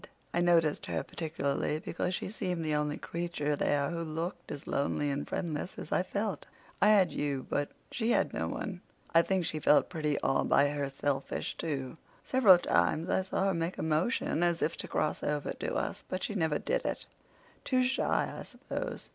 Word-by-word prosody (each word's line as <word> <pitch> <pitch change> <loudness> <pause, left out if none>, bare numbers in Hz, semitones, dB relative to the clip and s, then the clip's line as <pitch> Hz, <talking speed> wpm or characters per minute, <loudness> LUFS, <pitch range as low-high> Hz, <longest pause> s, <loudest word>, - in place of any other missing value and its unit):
I 175 - +2
noticed 165 -3 +3
her 85 -2 -1
particularly 150 -2 -2
because 180 +3 -2
she - - -4
seemed 180 -6 -2
the 155 - 0
only 150 0 0
creature 170 -4 -2
there 140 0 +1
who 170 -1 -3
looked 165 +2 -4
as 140 - -6
lonely 145 +1 0
and 140 +1 -3
friendless 165 +2 -3
as - - -7
I - - +3
felt. 200 -2 -3 0.3
I 205 - +6
had 200 -6 +5
you, 140 -2 -2
but 145 0 -1 0.2
she 230 -1 -1
had - - +2
no - - -1
one." 185 -4 -4 0.3
"I 165 - +8
think 185 0 0
she 155 - -2
felt 150 - +4
pretty 155 -4 0
all 135 - +2
by 145 - +4
herselfish, 140 -1 -2
too. 140 -3 -3 0.3
Several 220 -9 +7
times 165 -1 +1
I - - +3
saw 190 0 -1
her - - +1
make 165 +1 -2
a - - -3
motion 160 +3 +1
as 175 -1 +2
if 165 - 0
to - - -5
cross 155 - 0
over 150 -1 -1
to - - -4
us, - - -2
but 185 - -3
she - - -2
never 160 -6 +1
did - - -1
it—too 255 -1 -3
shy, 255 +1 +1
I - - -5
suppose. - - -6
165 Hz, 190 wpm, -31 LUFS, 145-185 Hz, 0.3 s, I